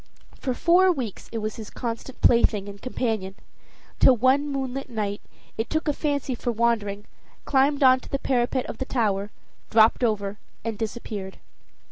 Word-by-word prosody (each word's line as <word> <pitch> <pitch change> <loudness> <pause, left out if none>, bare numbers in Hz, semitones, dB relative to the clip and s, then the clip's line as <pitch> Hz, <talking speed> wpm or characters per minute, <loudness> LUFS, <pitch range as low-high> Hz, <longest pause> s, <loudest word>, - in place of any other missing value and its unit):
For 255 -3 -2
four 365 +5 +5
weeks 250 - -5
it 230 - -3
was 215 -1 -3
his 220 -2 -7
constant 240 +2 -6
plaything 215 -4 +4
and 200 0 -9
companion, 220 -7 -2 0.6
till 255 - +6
one 260 +5 +3
moonlight 270 -1 -3
night 210 -3 -3 0.4
it 225 - -1
took 315 +1 -1
a 295 - +2
fancy 285 -3 -1
for 240 0 -2
wandering, 215 -3 0 0.4
climbed 280 +1 +2
on 260 0 +7
to - - -13
the 275 - 0
parapet 255 -1 0
of - - -7
the 265 - -2
tower, 205 -6 0 0.4
dropped 225 +2 +5
over 205 -3 0 0.2
and 225 0 -3
disappeared. 210 -3 -5
235 Hz, 160 wpm, -25 LUFS, 210-265 Hz, 0.6 s, on